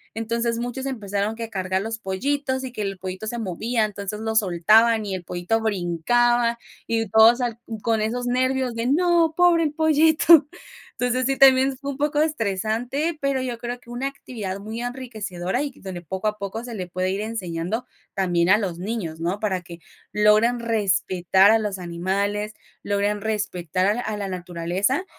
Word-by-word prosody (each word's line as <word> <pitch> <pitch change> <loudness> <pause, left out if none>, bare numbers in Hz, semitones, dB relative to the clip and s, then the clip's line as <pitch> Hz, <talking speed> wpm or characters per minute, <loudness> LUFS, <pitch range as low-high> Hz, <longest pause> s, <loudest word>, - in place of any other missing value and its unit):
entonces 230 +1 -1
muchos 245 +3 -4
empezaron 205 -4 -2
que 230 0 -6
cargar 190 -1 -1
a - - -4
los 225 +1 -4
pollitos 260 +7 -2
y 260 - -5
que 215 - -5
el 195 -1 -3
pollito 185 +3 -6
se 240 - -3
movía, 220 +2 -1
entonces 205 0 -5
lo 220 0 -3
soltaban 215 +3 +4
y 200 - -3
el 185 -2 -4
pollito 175 +6 -1
brincaba, 230 +5 +1 0.3
y 225 -1 0
todos 225 +3 +6
al 235 -2 -2 0.2
con 225 -2 +1
esos 240 +3 -2
nervios 255 0 0
de: 230 +1 -2
"No, 335 +2 +3
pobre 350 -2 +5
el 305 - 0
pollito". 315 0 +5 0.5
Entonces, 250 +1 +1
sí, 270 0 0
también 265 0 +5
fue 280 +1 -5
un 270 - -8
poco 295 +1 0
estresante, 245 - -1
pero 275 -1 0
yo 250 -2 -3
creo 240 +1 -5
que 235 - -19
una 245 +3 -3
actividad 220 -8 -6
muy 220 +3 -6
enriquecedora 235 -4 -3
y 290 - -4
donde 185 -2 -7
poco 190 +5 -4
a 210 0 -1
poco 200 +2 -5
se 245 - -7
le 185 -3 -5
puede 185 +1 -2
ir 195 +2 -2
enseñando 210 0 -3 0.3
también 175 -2 +1
a 200 - +7
los 185 -6 -3
niños, 180 -5 -4
¿no? 180 +4 -1
Para 195 -4 -1
que 170 -1 -11 0.3
logren 215 +3 +4
respetar 195 -4 +3
a 225 - +4
los 205 -3 -3
animales, 200 +4 -2 0.3
logren 205 +1 0
respetar 185 -5 -1
a - - -1
a 215 -3 -3
la 200 -1 -3
naturaleza, 180 - -1
220 Hz, 180 wpm, -23 LUFS, 190-245 Hz, 0.5 s, a